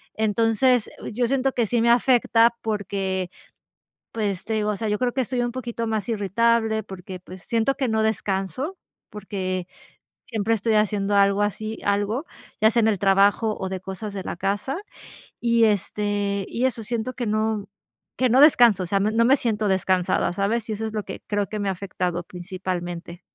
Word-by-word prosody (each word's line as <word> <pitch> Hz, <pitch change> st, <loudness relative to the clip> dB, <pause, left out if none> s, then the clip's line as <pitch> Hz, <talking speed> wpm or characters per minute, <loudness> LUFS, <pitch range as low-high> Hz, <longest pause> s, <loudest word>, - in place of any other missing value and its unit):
Entonces, 225 Hz, +3 st, +2 dB
oh, -, -, -10 dB
yo 240 Hz, +2 st, 0 dB
siento 270 Hz, +1 st, +1 dB
que 235 Hz, -3 st, +1 dB
sí 240 Hz, +3 st, +1 dB
me 235 Hz, -, +5 dB
afecta 235 Hz, -1 st, +4 dB
porque, 195 Hz, -3 st, -2 dB, 0.8 s
pues, 205 Hz, -4 st, -2 dB
te 225 Hz, -, -2 dB
digo, 210 Hz, -1 st, 0 dB
o -, -, -2 dB
sea, 220 Hz, 0 st, -2 dB
yo 210 Hz, -, 0 dB
creo 250 Hz, -1 st, +1 dB
que 265 Hz, -, +1 dB
estoy 250 Hz, 0 st, -1 dB
un 240 Hz, 0 st, -1 dB
poquito 235 Hz, -2 st, -4 dB
más 220 Hz, -3 st, -2 dB
irritable 220 Hz, +1 st, +1 dB
porque, 190 Hz, -2 st, -9 dB
pues, 185 Hz, 0 st, -12 dB
siento 230 Hz, +6 st, +1 dB
que 270 Hz, -2 st, -1 dB
no 220 Hz, -1 st, +1 dB
descanso 220 Hz, -, -2 dB, 0.3 s
porque 185 Hz, -3 st, -4 dB, 0.6 s
siempre 225 Hz, -1 st, 0 dB
estoy 225 Hz, +1 st, 0 dB
haciendo 205 Hz, -1 st, +1 dB
algo 200 Hz, 0 st, +4 dB
así 215 Hz, +2 st, -3 dB
algo, 205 Hz, +7 st, 0 dB, 0.4 s
ya 220 Hz, -, +7 dB
sea 235 Hz, -, +2 dB
en 220 Hz, -, +4 dB
el 210 Hz, -3 st, +1 dB
trabajo 200 Hz, +3 st, +3 dB
o 190 Hz, -, -3 dB
de 190 Hz, 0 st, -4 dB
cosas 190 Hz, +3 st, -6 dB
de 190 Hz, -2 st, -5 dB
la -, -, -4 dB
casa, 200 Hz, -, -2 dB, 0.6 s
y, 235 Hz, -1 st, +3 dB
este, 205 Hz, -1 st, 0 dB
y 245 Hz, -, -1 dB
eso 235 Hz, -3 st, -1 dB
siento 235 Hz, +2 st, -3 dB
que 245 Hz, -1 st, -4 dB
no, 215 Hz, +1 st, +1 dB
mm, 200 Hz, -, -9 dB, 0.5 s
que 255 Hz, -, +3 dB
no 255 Hz, +4 st, +5 dB
descanso. 240 Hz, -, +6 dB
O -, -, -3 dB
sea, 195 Hz, +3 st, +1 dB
no 205 Hz, +2 st, +1 dB
no 230 Hz, +1 st, +3 dB
me 270 Hz, +4 st, +5 dB
siento 215 Hz, -4 st, -1 dB
descansada, 185 Hz, -2 st, +1 dB
¿sabes?, 205 Hz, +4 st, -1 dB
y -, -, 0 dB
eso 220 Hz, +1 st, -3 dB
es -, -, -5 dB
lo 215 Hz, -1 st, -2 dB
que -, -, -7 dB
creo 205 Hz, -1 st, 0 dB
que 215 Hz, -, -4 dB
me 200 Hz, -1 st, -1 dB
ha -, -, 0 dB
afectado 180 Hz, -2 st, -3 dB
principalmente. 175 Hz, -1 st, -6 dB
210 Hz, 195 wpm, -24 LUFS, 195-230 Hz, 0.8 s, ya